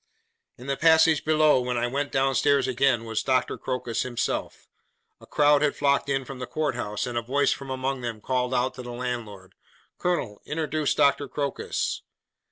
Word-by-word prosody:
In 125 - -12
the 140 0 -1
passage 160 0 +4
below, 155 -3 +4
when 125 0 -2
I 120 - +1
went 140 +4 -2
down 135 0 +2
stairs 140 0 +3
again, 130 -2 +1
was 110 -1 -2
Dr. 130 -1 +1
Crocus 125 -3 -3
himself. 120 -2 -3 0.5
A - - -16
crowd 145 -1 +4
had 150 -1 +1
flocked 140 0 +1
in 135 -1 0
from 135 -1 -8
the 125 - -5
Court 155 -3 -1
House, 105 -2 -3
and 120 -2 -2
a - - -5
voice 135 +5 +1
from 135 -1 -4
among 130 0 -2
them 115 -3 -4
called 125 +2 -1
out 125 +1 +1
to - - -8
the 120 -1 -7
landlord, 115 -6 -5 0.5
'Colonel! 150 -13 -2
introduce 155 -1 -1
Doctor 140 0 +3
Crocus. 140 +1 -2
130 Hz, 180 wpm, -26 LUFS, 120-145 Hz, 0.5 s, passage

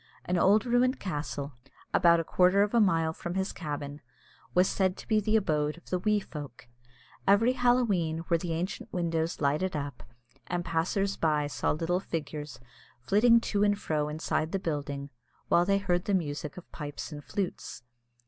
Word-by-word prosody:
An 180 - 0
old 205 +5 +4
ruined 250 +2 +2
castle, 145 -5 -4 0.4
about 170 -1 +5
a - - 0
quarter 185 +4 +4
of 205 - -2
a 235 - +5
mile 165 -5 +2
from 175 +2 -5
his 190 0 -1
cabin, 145 -2 -5 0.5
was 180 +1 +5
said 190 -1 0
to - - -11
be 215 -2 +3
the 215 +1 +1
abode 155 -7 +1
of 175 - -17
the 180 - +1
"wee 210 +2 +2
folk." 140 - -9 0.6
Every 220 +6 +5
Halloween 205 -11 +1
were 170 - +2
the 170 -1 -3
ancient 175 +5 -4
windows 165 -2 -1
lighted 155 +6 +1
up, 140 -3 -4 0.5
and 175 -1 -2
passers 190 +4 0
by 150 -2 +1
saw 145 - -1
little 165 +4 0
figures 150 -4 -5 0.4
flitting 215 - +5
to 205 -3 -1
and 205 0 +3
fro 150 -6 -1
inside 155 +1 -2
the - - +2
building, 145 -4 -4 0.4
while 175 - +4
they 195 +1 +3
heard 180 -2 0
the 200 - +2
music 150 -3 -3
of 180 - -11
pipes 145 +1 -6
and 145 -1 -8
flutes. 185 -10 -4
175 Hz, 175 wpm, -29 LUFS, 150-200 Hz, 0.6 s, about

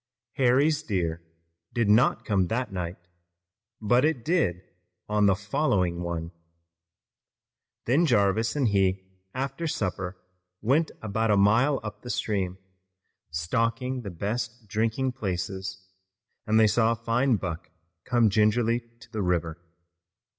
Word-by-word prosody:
Harry's 140 +4 +3
deer 85 - -2 0.5
did 115 -3 +2
not 110 +6 +3
come 95 -4 +1
that 120 0 -2
night, 90 -1 -4 0.8
but 120 +4 +3
it 150 -6 0
did 105 - +1 0.4
on 105 -1 +3
the 95 - +4
following 100 - 0
one. 85 -1 -4 1.5
Then 150 +8 +3
Jarvis 110 0 +2
and 135 -6 +2
he 95 -1 +1 0.3
after 135 +5 -3
supper 95 - -3 0.4
went 140 +9 +2
about 110 +1 0
a 105 - +4
mile 115 +8 +4
up 105 -1 -7
the 120 - -9
stream, 95 -6 -1 0.7
stalking 115 +11 -1
the 105 - -6
best 115 +5 -4
drinking 115 +5 0
places, 95 -4 -4 0.6
and 110 +1 +4
they 110 - +6
saw 115 +2 +3
a 115 -1 -10
fine 120 +2 +2
buck 90 -5 -5 0.3
come 120 -4 +3
gingerly 110 +3 +3 0.2
to - - -16
the 110 -3 -3
river. 85 -2 -1
110 Hz, 125 wpm, -27 LUFS, 95-125 Hz, 1.5 s, they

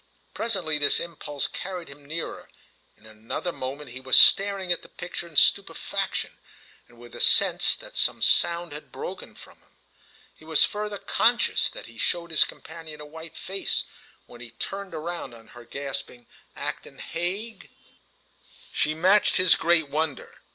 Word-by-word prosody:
Presently 180 -10 0
this 145 - +4
impulse 150 -4 -4
carried 180 -2 -6
him 140 +1 -13
nearer, 160 +3 -5 0.5
and 110 - -21
in 110 - -12
another 120 +10 -3
moment 135 -1 -6
he 130 +2 -8
was 130 -1 +5
staring 195 -2 +5
at 175 - +2
the - - -15
picture 175 -1 -6
in 165 - -16
stupefaction - - +2 0.5
and 120 - -20
with 120 0 -13
the - - -6
sense - - +4
that - - -13
some - - +2
sound 170 -1 +3
had 150 - -10
broken - - -7
from - - -15
him. - - -32 0.6
He - - -19
was 160 -1 +4
further 210 0 -4
conscious 235 +4 +2
that - - -9
he - - -13
showed 170 -1 -1
his 155 - +5
companion 160 -2 -10
a 150 - -8
white 160 +2 -10
face 195 +1 -2 0.4
when 120 - -14
he 120 - -8
turned 195 +11 -6
round 160 -5 -5
on 115 -1 -16
her 120 -1 -13
gasping: 135 -2 -6 0.3
"Acton - - -5
Hague!" 190 +6 -5 1.0
She 155 +1 +1
matched 190 +6 +4
his 185 0 +6
great 165 -2 +3
wonder. 150 -1 -2
160 Hz, 160 wpm, -26 LUFS, 140-180 Hz, 1.0 s, his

